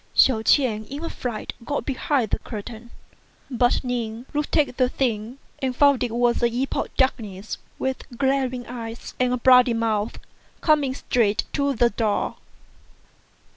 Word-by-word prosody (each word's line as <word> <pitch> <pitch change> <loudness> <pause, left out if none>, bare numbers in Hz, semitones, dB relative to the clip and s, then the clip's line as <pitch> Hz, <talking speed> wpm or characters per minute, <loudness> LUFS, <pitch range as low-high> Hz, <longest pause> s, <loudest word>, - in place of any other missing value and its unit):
Hsiao 235 -5 +5
ch'ien 225 -3 +3
in 285 +4 -6
a - - -4
fright 240 -4 -4
got 285 +4 -2
behind 265 -4 0
the - - +1
curtain; 225 +1 -8 0.6
but 245 0 +2
Ning 240 -2 -3
looked 295 +2 0
at 285 -5 +1
the 255 -1 +3
thing, 235 -2 -2 0.2
and 260 -2 -1
fou 285 +2 +6
id 255 - -3
it 235 -2 -2
was 240 0 +2
an 235 0 +3
imp 255 +3 -2
of - - -3
darkness, 215 -6 -1 0.2
with 265 0 -3
glaring 265 -2 0
eyes 230 -1 -7
and 250 -1 +2
a 250 - +1
b'oody 250 -1 +6
mouth, 220 -1 -1 0.4
coming 295 -5 +2
straight 220 -6 +1
to 280 -1 +1
the 235 +1 +3
door. 210 -1 -1
245 Hz, 160 wpm, -24 LUFS, 225-265 Hz, 0.6 s, fou